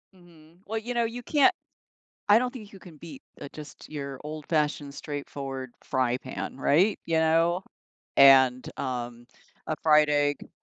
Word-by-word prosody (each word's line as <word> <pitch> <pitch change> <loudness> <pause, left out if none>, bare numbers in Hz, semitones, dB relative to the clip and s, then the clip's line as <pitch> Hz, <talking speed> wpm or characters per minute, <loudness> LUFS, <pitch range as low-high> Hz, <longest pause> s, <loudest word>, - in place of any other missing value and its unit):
Mhm, 170 -1 -20
well, 220 +2 -3
you 230 +3 -4
know, 235 -1 +1
you 235 +2 -6
can't 290 -1 +4 0.8
I 210 +3 +7
don't 250 0 -2
think 215 -6 -10
you 195 - -12
can 165 -4 -14
beat 150 -4 -11 0.2
uh, 140 - -7
just 150 -3 -11
your 140 -3 -6
old 150 0 -7
fashioned 150 -3 -1
straightforward 135 -3 -6
fry 130 -2 0
pan, - - -7
right? 180 +10 +3
You 165 -1 0
know? 165 +3 +2 0.5
And, 130 -2 +6
um, 120 -2 -5 0.4
a 155 - -1
fried 150 -1 +4
egg. 145 0 0
150 Hz, 160 wpm, -27 LUFS, 140-175 Hz, 0.8 s, I